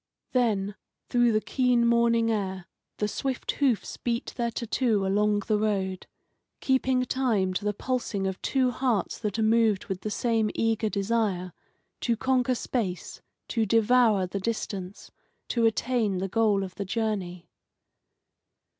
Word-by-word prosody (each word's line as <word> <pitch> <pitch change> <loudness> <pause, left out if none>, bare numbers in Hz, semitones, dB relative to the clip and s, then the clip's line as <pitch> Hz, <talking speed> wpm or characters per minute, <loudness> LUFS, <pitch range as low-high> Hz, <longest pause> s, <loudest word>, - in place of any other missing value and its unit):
Then, 210 -6 +1 0.4
through 240 -1 +3
the 215 - +3
keen 250 -2 +2
morning 235 -1 +3
air, 190 -4 -2 0.3
the 210 - 0
swift 260 +4 -2
hoofs 250 -9 0
beat 235 +1 -3
their 235 -1 0
tattoo 230 -3 0
along 205 +1 +2
the 215 -2 +1
road, 195 -3 -1 0.5
keeping 260 -1 +2
time 225 -8 0
to 190 - -3
the 210 - +2
pulsing 235 -5 -2
of 190 -1 -3
two 260 -2 +1
hearts 245 -7 -1
that 210 -1 -3
are 220 - +1
moved 220 -2 +3
with 190 -4 -4
the 215 - -3
same 225 0 +1
eager 225 -1 +1
desire 200 -4 -1 0.5
to 235 -2 0
conquer 255 0 +1
space, 210 -7 -3 0.3
to 225 -3 0
devour 225 -2 +4
the 190 +2 -4
distance, 195 -3 -4 0.4
to 230 -2 +3
attain 225 -3 0
the 190 +2 -2
goal 210 -1 +2
of 185 -1 -6
the 200 - -5
journey. 190 -5 -3
220 Hz, 145 wpm, -27 LUFS, 195-235 Hz, 0.5 s, devour